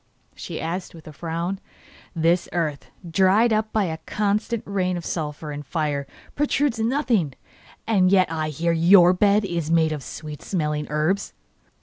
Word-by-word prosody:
she - - -7
asked, 175 +2 -4
with 160 - -13
a 155 - -9
frown. 170 +4 -3 0.6
'This 170 +2 +2
earth, 155 -5 -2 0.2
dried 190 +7 +3
up 215 0 0
by 215 - +1
a 160 -3 -3
constant 210 +2 -1
rain 185 -2 -1
of 170 - -7
sulphur 150 -1 -4
and 145 0 -6
fire, 145 -1 -2 0.3
produces 280 -5 +1
nothing, 230 - +1 0.5
yet 185 -4 +3
I 155 -1 -2
hear 165 +3 0
that 165 - -1
YOUR 180 +1 +7
bed 200 +2 +3
is 170 -4 -3
made 165 -1 +3
of 150 -2 -3
sweet 150 +2 -8
smelling 150 -5 -2
herbs. 155 +6 0
175 Hz, 155 wpm, -23 LUFS, 155-200 Hz, 0.6 s, YOUR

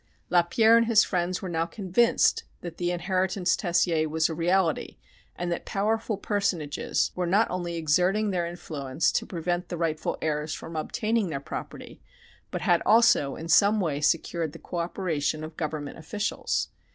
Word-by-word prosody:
Lapierre 220 +6 +5
and 230 -1 +3
his 225 -3 +6
friends 180 0 -2
were - - -3
now 165 -1 -1
convinced 200 +5 +2 0.2
that 170 -2 -7
the 175 -1 -1
inheritance 185 +1 0
Tessier 170 -3 +1
was 160 +1 +1
a - - -3
reality, 170 0 0 0.4
and 175 0 -3
that 170 - -2
powerful 215 +1 -1
personages 185 -8 -1
were 180 -1 -2
not 205 +6 +3
only 175 -1 -3
exerting 180 +7 +2
their 175 -2 -1
influence 155 -4 -2
to - - -1
prevent 175 0 -3
the 175 - -4
rightful 160 -2 -1
heirs 150 0 -2
from 165 - -9
obtaining 215 +7 -1
their 140 -3 -3
property, 140 - -8 0.5
but - - -4
had - - +3
also 220 -11 +4
in 165 - -7
some 205 +5 +5
way 150 -6 -1
secured 160 0 0
the - - -9
cooperation 170 -3 -2
of 155 0 -8
government 155 -2 -4
officials. 205 +6 -2
175 Hz, 160 wpm, -27 LUFS, 160-195 Hz, 0.5 s, his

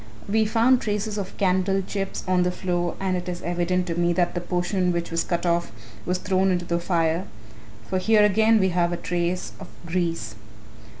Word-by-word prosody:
We 220 +2 +2
found 235 +4 +3
traces 210 0 -2
of 195 -1 -6
candle 190 0 +1
chips 195 0 -4
on 185 -1 +3
the 180 - +2
floor 175 -1 -2
and 190 -1 0
it 180 0 -4
is 175 0 -5
evident 175 +1 0
to 170 - -2
me 175 +1 +1
that 175 -1 +1
the 175 - -3
portion 180 +1 0
which 170 -1 -2
was 165 - +1
cut 175 0 -2
off 170 0 +1 0.4
was 180 +1 +1
thrown 190 +1 +1
into 175 -1 0
the 170 0 0
fire, 170 0 0 0.6
for 185 - 0
here 215 +2 +4
again 220 +2 +4
we 190 -1 +3
have 175 -1 +1
a 175 - -2
trace 175 +1 -2
of 190 - -9 0.2
grease." 165 -10 -2
180 Hz, 195 wpm, -24 LUFS, 175-195 Hz, 0.6 s, here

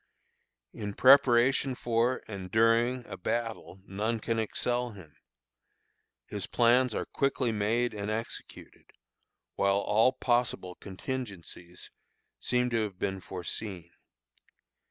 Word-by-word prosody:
In 105 -2 -5
preparation 130 0 +5
for, 120 +1 0
and 95 -3 -7
during, 115 +3 +3
a - - -7
battle, 110 -1 -4
none 110 +4 -2
can 115 +1 -1
excel 120 +2 -1
him. 90 -7 -14 1.1
His 100 -2 -5
plans 120 0 +3
are - - -2
quickly 135 -3 0
made 110 +3 0
and 105 0 -4
executed, 110 +1 -7 0.7
while 100 0 +2
all 110 +5 +3
possible 120 -8 0
contingencies 95 -5 -7 0.5
seem 125 0 0
to 115 -1 +1
have 100 -4 -4
been 95 0 -2
foreseen. 90 -1 -6
115 Hz, 110 wpm, -29 LUFS, 100-120 Hz, 1.1 s, preparation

